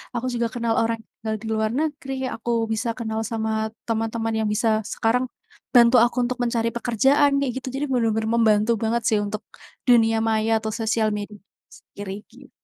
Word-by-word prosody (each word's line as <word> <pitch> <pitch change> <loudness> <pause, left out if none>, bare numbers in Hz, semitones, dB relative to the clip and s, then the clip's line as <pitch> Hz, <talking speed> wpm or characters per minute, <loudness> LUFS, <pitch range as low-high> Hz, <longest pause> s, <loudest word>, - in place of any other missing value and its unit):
aku 235 - -2
juga 235 -1 0
kenal 235 -2 0
orang 230 0 0 0.2
tinggal 220 0 -2
di 225 - -7
luar 220 0 0
negeri, 290 0 -2 0.2
aku 230 0 -1
bisa 225 +2 -1
kenal 220 -2 -3
sama 220 -1 -2 0.2
teman-teman 225 0 -1
yang - - 0
bisa 220 0 +2
sekarang 245 +3 +1 0.5
bantu 240 +1 +7
aku 240 - +1
untuk 250 +1 -3
mencari 230 -1 0
pekerjaan, 270 +5 +3
kayak 275 -3 0
gitu, - - -9
jadi 285 +2 -1
benar-benar 225 -3 +1
membantu 215 0 +3
banget 230 +2 0
sih 215 - +3
untuk 210 +1 -4 0.5
dunia 225 -2 +5
maya 220 0 +2
atau 220 - -2
sosial 225 -1 0
media 210 0 -6
itu 200 - -28
sendiri, 200 -1 -7 0.2
git 265 +3 -16
225 Hz, 175 wpm, -23 LUFS, 220-240 Hz, 0.5 s, bantu